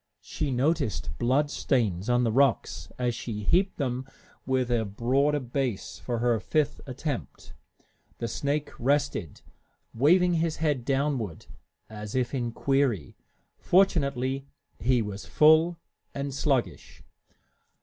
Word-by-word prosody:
She 150 Hz, -, -3 dB
noticed 135 Hz, -, 0 dB
blood 135 Hz, +5 st, +2 dB
stains 110 Hz, -, 0 dB
on 125 Hz, 0 st, +3 dB
the 115 Hz, -, +1 dB
rocks 135 Hz, +1 st, +1 dB
as 125 Hz, -1 st, 0 dB
she 110 Hz, -2 st, -5 dB
heaped 185 Hz, -, +2 dB
them 130 Hz, -2 st, -2 dB, 0.4 s
with 130 Hz, -2 st, +1 dB
a 115 Hz, -2 st, +2 dB
broader 130 Hz, +8 st, +1 dB
base 125 Hz, -4 st, -3 dB
for 120 Hz, -2 st, -3 dB
her 120 Hz, -1 st, +2 dB
fifth 150 Hz, +9 st, 0 dB
attempt. 135 Hz, +1 st, -5 dB, 0.6 s
The 115 Hz, -, -3 dB
snake 140 Hz, +5 st, -2 dB
rested, 140 Hz, -, 0 dB, 0.5 s
waving 175 Hz, +8 st, +4 dB
his 165 Hz, -1 st, 0 dB
head 145 Hz, -6 st, -1 dB
downward 135 Hz, -, -1 dB, 0.4 s
as 105 Hz, 0 st, -7 dB
if 125 Hz, 0 st, 0 dB
in 120 Hz, -3 st, -1 dB
query. 130 Hz, -, 0 dB, 0.4 s
Fortunately, 140 Hz, -8 st, +2 dB, 0.3 s
he 120 Hz, +2 st, +2 dB
was 105 Hz, -1 st, -7 dB
full 160 Hz, +3 st, +5 dB, 0.4 s
and 140 Hz, 0 st, -3 dB
sluggish. 135 Hz, -2 st, -2 dB
130 Hz, 120 wpm, -27 LUFS, 120-145 Hz, 0.6 s, full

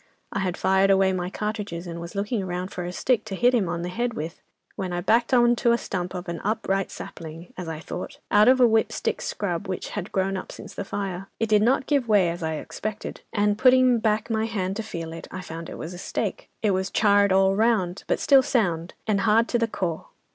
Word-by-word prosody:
I -, -, -1 dB
had 185 Hz, -2 st, -1 dB
fired 190 Hz, +1 st, +3 dB
away 190 Hz, -1 st, +4 dB
my 180 Hz, -1 st, -2 dB
cartridges, 205 Hz, -4 st, -4 dB
and 170 Hz, -1 st, -6 dB
was 170 Hz, +3 st, -8 dB
looking 205 Hz, +1 st, -1 dB
round 180 Hz, 0 st, -4 dB
for 180 Hz, -, -4 dB
a 175 Hz, -, -4 dB
stick 230 Hz, +4 st, +1 dB
to 200 Hz, -3 st, -4 dB
hit 245 Hz, +5 st, +3 dB
him 210 Hz, -8 st, +2 dB
on 170 Hz, 0 st, -2 dB
the 175 Hz, -, -3 dB
head 235 Hz, +5 st, -2 dB
with, 160 Hz, +3 st, -5 dB, 0.3 s
when 190 Hz, -3 st, -3 dB
I 175 Hz, -, -1 dB
backed 230 Hz, +6 st, +2 dB
on 240 Hz, -1 st, +5 dB
to 235 Hz, -1 st, +3 dB
a -, -, +3 dB
stump 180 Hz, -4 st, -4 dB
of 180 Hz, +1 st, -5 dB
an 170 Hz, -1 st, -4 dB
upright 195 Hz, -2 st, 0 dB
sapling, 165 Hz, +1 st, -9 dB
as 180 Hz, -2 st, -6 dB
I 160 Hz, -1 st, -4 dB
thought, 160 Hz, -, -6 dB
out 210 Hz, +2 st, +6 dB
of 260 Hz, +1 st, +6 dB
a 250 Hz, -, +7 dB
'whip 225 Hz, -1 st, +3 dB
stick -, -, -2 dB
scrub,' -, -, -3 dB
which -, -, -4 dB
had -, -, -5 dB
grown 195 Hz, 0 st, 0 dB
up 185 Hz, -, -7 dB
since -, -, -10 dB
the -, -, -4 dB
fire. 195 Hz, -1 st, -4 dB
"It 225 Hz, -, 0 dB
did 210 Hz, -1 st, +5 dB
not 255 Hz, +4 st, +3 dB
give 280 Hz, -5 st, +1 dB
way, 200 Hz, -5 st, +4 dB
as 170 Hz, -, -6 dB
I 160 Hz, -1 st, -1 dB
expected, 215 Hz, +7 st, -5 dB
and 205 Hz, 0 st, +1 dB
putting 255 Hz, -2 st, +5 dB
back 215 Hz, -1 st, +1 dB
my 220 Hz, 0 st, +1 dB
hand 195 Hz, -4 st, -2 dB
to -, -, -1 dB
feel 165 Hz, -7 st, -6 dB
it, 165 Hz, -, -8 dB
I 185 Hz, -, -6 dB
found 165 Hz, -1 st, -7 dB
it -, -, -7 dB
was 165 Hz, +3 st, -6 dB
a 175 Hz, -, -8 dB
stake! -, -, -3 dB
It 210 Hz, -, +3 dB
was 190 Hz, +1 st, 0 dB
charred 205 Hz, -1 st, +4 dB
all 190 Hz, 0 st, +4 dB
round, 200 Hz, -5 st, +1 dB
but -, -, +1 dB
still 275 Hz, -2 st, +6 dB
sound, 180 Hz, -10 st, 0 dB
and 205 Hz, -2 st, +1 dB
hard 225 Hz, +2 st, +4 dB
to 240 Hz, -, +1 dB
the 230 Hz, -, +2 dB
core. 175 Hz, -7 st, -3 dB
195 Hz, 240 wpm, -25 LUFS, 180-225 Hz, 0.3 s, a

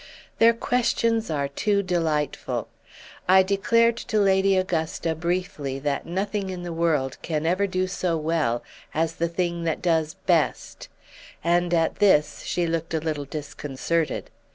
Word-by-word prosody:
Their 230 Hz, +1 st, +6 dB
questions 230 Hz, -2 st, +1 dB
are 145 Hz, -3 st, 0 dB
too 200 Hz, +8 st, 0 dB
delightful! 160 Hz, -5 st, -1 dB, 0.6 s
I 190 Hz, 0 st, +7 dB
declared 230 Hz, +4 st, +2 dB
to 225 Hz, -3 st, -2 dB
Lady 195 Hz, -1 st, +4 dB
Augusta 165 Hz, -2 st, -1 dB
briefly 160 Hz, -5 st, -2 dB
that 140 Hz, 0 st, -2 dB
nothing 195 Hz, +2 st, -2 dB
in 180 Hz, -1 st, -5 dB
the 175 Hz, -1 st, -4 dB
world 155 Hz, -6 st, 0 dB
can 155 Hz, -1 st, -2 dB
ever 185 Hz, +4 st, +2 dB
do 185 Hz, -1 st, 0 dB
so 185 Hz, -2 st, -1 dB
well 155 Hz, -7 st, 0 dB, 0.3 s
as 165 Hz, +1 st, 0 dB
the 170 Hz, 0 st, 0 dB
thing 170 Hz, 0 st, -2 dB
that 160 Hz, -, 0 dB
does 160 Hz, -1 st, +1 dB
best; 165 Hz, -4 st, 0 dB, 0.5 s
and 175 Hz, +1 st, +2 dB
at 165 Hz, -2 st, +1 dB
this 150 Hz, -8 st, +3 dB
she 175 Hz, -, -1 dB
looked 165 Hz, 0 st, -2 dB
a -, -, +1 dB
little 155 Hz, -2 st, -3 dB
disconcerted. 145 Hz, +2 st, -3 dB
170 Hz, 145 wpm, -25 LUFS, 155-190 Hz, 0.6 s, I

